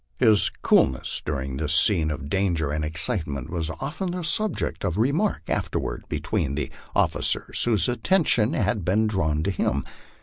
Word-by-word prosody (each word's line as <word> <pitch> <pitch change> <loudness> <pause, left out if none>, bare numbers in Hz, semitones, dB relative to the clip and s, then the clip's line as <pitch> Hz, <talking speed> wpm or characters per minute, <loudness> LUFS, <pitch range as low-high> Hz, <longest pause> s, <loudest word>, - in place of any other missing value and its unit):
His 110 -5 +3
coolness 65 -1 +1
during 70 -3 -4
this 75 +1 0
scene 80 -2 +5
of 70 -2 -5
danger 85 -4 -1
and 75 +1 -2
excitement 75 - +1
was 85 -2 -1
often 145 - -5
the 180 0 -4
subject 205 +4 +1
of 90 -2 -2
remark 145 - 0
afterward - - -3
between 70 -3 -2
the 75 - -4 0.2
officers - - +1
whose 115 -2 +3
attention 125 - +1
had 105 -3 -1
been 100 +6 +1
drawn 80 -8 -1
to 100 - -1
him. 70 -6 -1
90 Hz, 155 wpm, -24 LUFS, 75-115 Hz, 0.2 s, scene